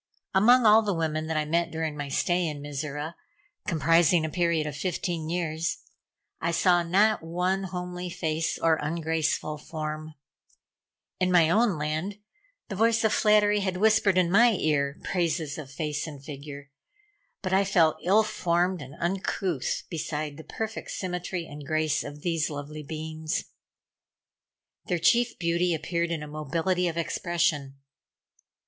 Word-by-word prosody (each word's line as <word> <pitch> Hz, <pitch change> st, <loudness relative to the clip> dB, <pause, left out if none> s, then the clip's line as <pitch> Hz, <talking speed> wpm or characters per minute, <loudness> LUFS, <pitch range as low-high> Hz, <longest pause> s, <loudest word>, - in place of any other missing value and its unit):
Among 235 Hz, +5 st, +6 dB
all 215 Hz, +1 st, +7 dB
the 205 Hz, -4 st, -1 dB
women 155 Hz, -1 st, -1 dB
that 160 Hz, -1 st, -1 dB
I 155 Hz, -, +1 dB
met 170 Hz, +2 st, +1 dB
during 160 Hz, -2 st, -3 dB
my 145 Hz, -1 st, -5 dB
stay 175 Hz, +4 st, +1 dB
in 150 Hz, -2 st, -4 dB
Mizora 145 Hz, +2 st, -5 dB, 0.5 s
comprising 165 Hz, 0 st, +3 dB
a 160 Hz, -, -4 dB
period 170 Hz, -3 st, +1 dB
of 150 Hz, -2 st, -4 dB
fifteen 170 Hz, -2 st, -2 dB
years 165 Hz, -1 st, -1 dB, 0.6 s
I 170 Hz, -, -1 dB
saw 175 Hz, +1 st, +3 dB
not 200 Hz, +6 st, +3 dB
one 180 Hz, +4 st, -1 dB
homely 180 Hz, 0 st, -5 dB
face 160 Hz, -1 st, -2 dB
or 160 Hz, -1 st, +2 dB
ungraceful 155 Hz, -1 st, -1 dB
form. 155 Hz, 0 st, -6 dB, 1.0 s
In 185 Hz, 0 st, +2 dB
my 170 Hz, -3 st, +5 dB
own 215 Hz, -3 st, +3 dB
land 155 Hz, +7 st, -2 dB, 0.5 s
the 205 Hz, -, -5 dB
voice 225 Hz, +2 st, +3 dB
of 220 Hz, -, +3 dB
flattery 210 Hz, -1 st, +4 dB
had 190 Hz, -2 st, -1 dB
whispered 210 Hz, -2 st, +4 dB
in 175 Hz, -2 st, +3 dB
my 235 Hz, +4 st, +6 dB
ear 145 Hz, -6 st, 0 dB
praises 160 Hz, -4 st, -1 dB
of 145 Hz, -3 st, -8 dB
face 150 Hz, +1 st, -3 dB
and 140 Hz, -3 st, -10 dB
figure, 145 Hz, -1 st, -9 dB, 0.7 s
but 185 Hz, -1 st, -1 dB
I 195 Hz, +1 st, +5 dB
felt 170 Hz, -5 st, +3 dB
ill 205 Hz, +5 st, +5 dB
formed 180 Hz, -4 st, 0 dB
and 135 Hz, +1 st, -10 dB
uncouth 180 Hz, -3 st, -1 dB
beside 155 Hz, -2 st, -4 dB
the 160 Hz, -, -9 dB
perfect 220 Hz, +4 st, -5 dB
symmetry 180 Hz, -1 st, -3 dB
and 145 Hz, -1 st, -9 dB
grace 155 Hz, 0 st, 0 dB
of 145 Hz, 0 st, -9 dB
these 165 Hz, -2 st, 0 dB
lovely 150 Hz, +1 st, -6 dB
beings. 155 Hz, +1 st, -4 dB, 1.4 s
Their 180 Hz, -, +1 dB
chief 240 Hz, +7 st, +3 dB
beauty 170 Hz, 0 st, +1 dB
appeared 170 Hz, +2 st, -1 dB
in 165 Hz, -3 st, -3 dB
a -, -, -7 dB
mobility 165 Hz, +5 st, -1 dB
of 170 Hz, -1 st, -3 dB
expression. 165 Hz, -4 st, 0 dB
165 Hz, 150 wpm, -27 LUFS, 155-185 Hz, 1.4 s, all